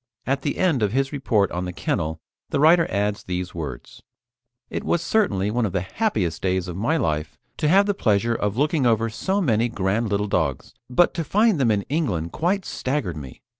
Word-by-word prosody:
At 135 +1 0
the 145 - -2
end 165 -10 +2
of 105 0 +1
his 135 +1 +1
report 110 -8 +1
on 90 +1 -3
the 90 - -4
kennel 80 -2 -2 0.3
the - - 0
writer 165 +3 +5
adds 105 +1 -1
these 90 0 -4
words: 75 -7 -7 0.7
"It - - -4
was 170 - 0
certainly 105 - +1
one 120 +2 0
of 105 - -1
the 95 - 0
happiest 95 - -1
days 95 -1 0
of 90 - -5
my 115 - +1
life 75 - -2 0.2
to 150 - 0
have 195 +6 +5
the 205 - +1
pleasure 115 - +1
of 105 -1 -2
looking 145 -1 +2
over 115 -1 +2
so 190 - -1
many 120 - +2
grand 105 +2 -1
little 105 +1 0
dogs, 80 -9 -1 0.2
but 150 +8 +3
to 165 - -2
find 210 +3 +2
them 125 -4 +3
in 105 -2 +1
England 100 - -2
quite 185 +4 0
staggered 130 - -2
me. 70 -4 -10
115 Hz, 205 wpm, -23 LUFS, 95-150 Hz, 0.7 s, writer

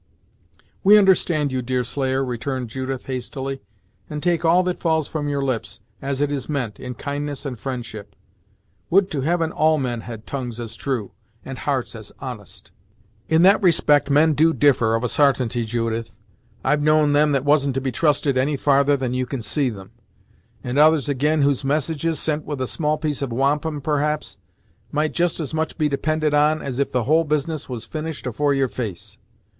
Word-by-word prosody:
"We 210 +2 +8
understand 175 -7 +3
you, 130 -1 -1
Deerslayer," 130 +2 -1
returned 125 0 -3
Judith, 130 +1 -4
hastily, 135 +1 -5 0.5
"and 150 -1 -5
take 175 -1 +1
all 170 +2 +4
that 180 -1 -2
falls 160 -3 +1
from 145 -2 -3
your 140 -1 -1
lips, 130 -4 -3 0.2
as 135 0 -2
it 145 0 +1
is 140 -2 -4
meant, 130 -8 -3
in 125 -1 -6
kindness 145 +2 -4
and 125 -5 -5
friendship. 110 -6 -6 0.7
Would 195 +2 +3
to 145 -4 -2
Heaven 165 +2 0
all 155 0 +3
men 125 -4 -2
had 110 -1 -9
tongues 125 -4 -5
as 115 -2 -6
true, 125 -7 -3 0.3
and - - -7
hearts - - -1
as - - -9
honest!" - - -9 0.6
"In 160 +1 +4
that 195 +3 +6
respect 150 -5 +3
men 155 +3 +4
do 160 +2 +3
differ, 120 -6 +3
of 115 - -2
a - - +1
sartainty, 125 -3 +1
Judith. 115 0 -3 0.5
I've 150 0 +2
known 155 -1 +3
them 150 +1 +4
that 135 0 0
wasn't 140 -2 +3
to 135 - 0
be 130 0 -2
trusted 145 -1 +1
any 140 +2 +1
farther 140 0 +3
than 130 -2 -2
you 130 0 -1
can 125 -3 -4
see 135 +5 +1
them; 95 -4 -10 0.7
and 125 +3 -1
others 155 -1 +4
ag'in 145 +2 +1
whose 140 -1 +1
messages, 155 +2 0
sent 155 -1 -1
with 145 -3 -5
a 130 - 0
small 155 +3 -1
piece 150 -2 -2
of 135 -3 -2
wampum, 145 +4 0
perhaps, 150 -7 -1 0.5
might 150 +1 0
just 175 -1 0
as 155 -2 -4
much 160 0 -2
be 155 -2 +2
depended 155 +2 0
on, 150 +1 +3
as 135 -2 -4
if 140 - 0
the 125 -2 0
whole 155 +6 +3
business 150 0 -2
was 120 -3 -5
finished 155 -2 -5
afore 140 +4 0
your 135 -1 +2
face. 110 -8 -6
140 Hz, 185 wpm, -22 LUFS, 130-155 Hz, 0.7 s, We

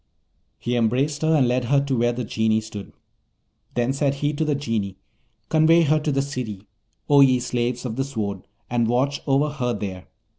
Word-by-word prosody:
He 120 +1 -2
embraced 130 +6 +1
her, 160 0 +3
and 135 -5 +3
led 125 0 0
her 140 +3 +3
to 135 -2 0
where 120 0 +2
the 120 +1 -4
Genii 110 0 +1
stood. 110 -2 -9 0.8
Then 120 +2 +1
said 140 0 0
he 145 +2 -1
to 150 - -1
the 150 -2 0
Genii, 110 -8 -3 0.5
'Convey 165 +1 +5
her 155 0 +3
to 150 0 -1
the 135 0 +1
City, 120 -8 -5 0.4
O 145 -1 +6
ye 130 -2 +5
slaves 125 0 -2
of 115 -2 -4
the 135 - +1
Sword, 105 -8 -4 0.2
and 120 -1 +1
watch 130 +4 0
over 140 +2 +2
her 125 -5 -2
there. 95 -3 -6
125 Hz, 190 wpm, -23 LUFS, 115-145 Hz, 0.8 s, O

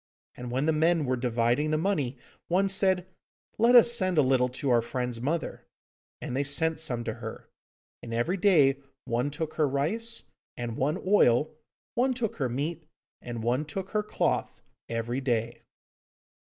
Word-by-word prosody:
And 125 0 -7
when 130 +4 0
the 160 - +2
men 160 0 +2
were 130 0 +1
dividing 120 +3 +1
the 155 - +1
money, 155 -8 -1 0.3
one 190 +3 +2
said, 190 -2 +2 0.5
'Let 235 +2 +5
us 235 -1 +8
send 185 -7 +1
a 150 - +6
little 130 -1 +2
to 130 +2 -2
our 120 -1 +4
friend's 125 -1 -4
mother,' 160 +6 -3 0.5
and 125 - -5
they 140 - +1
sent 160 +3 0
some 120 -7 -2
to - - -3
her; - - -9 0.5
and 115 - -8
every 120 +12 0
day 150 -8 +4 0.3
one 120 +4 0
took 155 +2 -4
her 155 -2 +3
rice, 210 - -1 0.3
and 120 -2 -4
one 150 +9 0
oil; 155 - +4 0.4
one 255 +2 +1
took 235 -4 -3
her 135 -4 -1
meat, 150 +5 -3 0.3
and 120 -2 -6
one 125 +5 +1
took 185 +6 -6
her 210 - +1
cloth, 210 - -2 0.3
every 115 +3 -2
day. 120 -3 -1
145 Hz, 170 wpm, -28 LUFS, 125-180 Hz, 0.5 s, us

